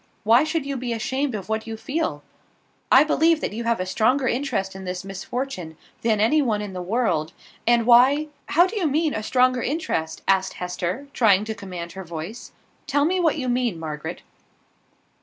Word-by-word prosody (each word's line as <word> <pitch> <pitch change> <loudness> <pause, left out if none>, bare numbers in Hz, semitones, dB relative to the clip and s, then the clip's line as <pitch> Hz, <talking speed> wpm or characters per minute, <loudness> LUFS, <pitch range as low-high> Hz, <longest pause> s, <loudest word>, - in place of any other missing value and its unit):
Why 230 +5 +5
should 310 -2 -1
you 275 -1 -3
be 245 -1 -3
ashamed 260 +3 -2
of 195 -3 -6
what 220 0 -2
you 225 0 -5
feel? 310 +8 -3 0.7
I 265 - +8
believe 320 +1 +3
that - - -3
you 230 +2 -4
have 230 -2 +1
a 185 - -1
stronger 250 +8 +2
interest 240 -8 -1
in 190 - -8
this 180 0 -4
misfortune 195 - -5 0.2
than 220 -2 +1
any 265 +9 +4
one 225 -6 0
in 205 -2 -5
the 180 - -4
world; 180 -5 0 0.3
and 235 -1 +4
why 265 +6 +5
" - - -39
"How 350 - +8
do 375 - -5
you 360 -6 +1
mean, 305 +2 +1
a 220 - -2
stronger 255 +2 +2
interest?" 165 - -2
asked 190 -1 +2
Hester, 180 +7 -4
trying 210 -4 +4
to 220 - -3
command 180 -5 -7
her 190 - -8
voice. 170 +6 -7 0.4
"Tell 285 +1 +2
me 370 +3 +1
what 330 -3 +2
you 260 -4 -3
mean, 245 -6 0
Margaret." 150 -2 -6
230 Hz, 195 wpm, -23 LUFS, 190-275 Hz, 0.7 s, I